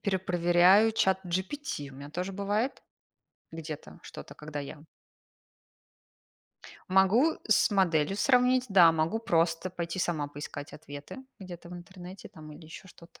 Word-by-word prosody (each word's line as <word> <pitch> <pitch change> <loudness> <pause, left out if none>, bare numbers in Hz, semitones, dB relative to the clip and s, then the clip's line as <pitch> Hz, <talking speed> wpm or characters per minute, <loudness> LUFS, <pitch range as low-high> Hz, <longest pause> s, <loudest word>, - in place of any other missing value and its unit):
перепроверяю 185 +2 +3
ChatGPT, 190 - -2
у - - -14
мя 140 +1 -9
тоже 180 +5 -4
бывает 205 +6 -2 0.7
где-то, 160 -2 -8
что-то, - - -11
когда 150 -1 -8
я 145 +1 -9 2.1
Могу 195 - +4
с 215 - +4
моделью 185 -3 +1
сравнить, 250 +2 +3
да. 180 -5 +6
Могу 160 +7 0
просто 170 -4 0
пойти 170 0 -5
сама 155 -5 -1
поискать 145 0 -8
ответы 145 - -10 0.2
где-то 180 -3 -10
в 180 - -9
интернете 180 +2 -11
там 155 -1 -12
или 155 +2 -13
еще 165 +4 -12
что-то. 170 -2 -18
175 Hz, 125 wpm, -29 LUFS, 160-195 Hz, 2.1 s, да